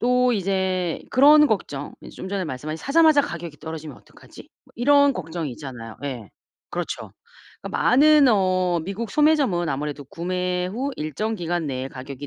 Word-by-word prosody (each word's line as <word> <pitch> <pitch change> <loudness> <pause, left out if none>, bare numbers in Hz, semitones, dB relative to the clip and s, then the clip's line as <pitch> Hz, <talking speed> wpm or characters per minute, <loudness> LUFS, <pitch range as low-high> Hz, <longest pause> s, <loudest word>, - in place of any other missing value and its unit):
또 250 +1 +3
이제 190 -3 -1
그런 300 +3 +7
걱정 145 - -3
이제 - - -10
좀 185 - -7
전에 195 -1 -2
말씀하신 155 +1 -5
'사자마자 310 - +4
가격이 170 - -7
떨어지면 160 -3 -8
어떡하지?' - - -16 0.2
뭐 - - -24
이런 285 +3 +4
걱정이 165 - -5
있잖아요. 120 -5 -9
예. 120 -7 -6 0.4
그렇죠. - - -5 0.5
그러니까 - - -4
많은 290 +1 +6
어 185 -4 +2
미국 200 +3 -5
소매점은 285 - +2
아무래도 145 +1 -4
구매 180 +3 -2
후 250 +9 -3
일정 210 +9 -3
기간 175 -2 -2
내에 130 -1 -4
가격이 135 +2 -8
180 Hz, 360 characters per minute, -23 LUFS, 150-245 Hz, 0.5 s, 그런